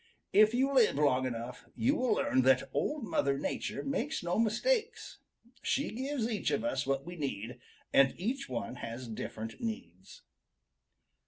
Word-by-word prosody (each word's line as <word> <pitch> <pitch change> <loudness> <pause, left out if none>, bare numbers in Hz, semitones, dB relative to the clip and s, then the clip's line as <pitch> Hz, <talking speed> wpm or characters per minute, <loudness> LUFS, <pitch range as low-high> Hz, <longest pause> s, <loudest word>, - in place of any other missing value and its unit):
If 215 +2 +6
you 270 +2 +2
live 245 - +5
long 130 -3 +3
enough, 120 0 -6
you 245 +5 +2
will 255 -4 +2
learn 130 - +2
that 130 0 +3
Old 300 -3 -1
Mother 140 -10 +1
Nature 210 +8 -3
makes 275 - -2
no 175 +4 0
mistakes. 450 - 0 0.4
She 280 - 0
gives 260 +1 -2
each 220 -3 -1
of 210 - 0
us 195 - -1
what 135 0 0
we 175 - -7
need, 125 -6 -4 0.3
and 135 0 +5
each 240 - -2
one 125 0 -4
has 120 +2 -6
different 110 0 -6
needs." 95 - -6
180 Hz, 155 wpm, -32 LUFS, -, 0.4 s, If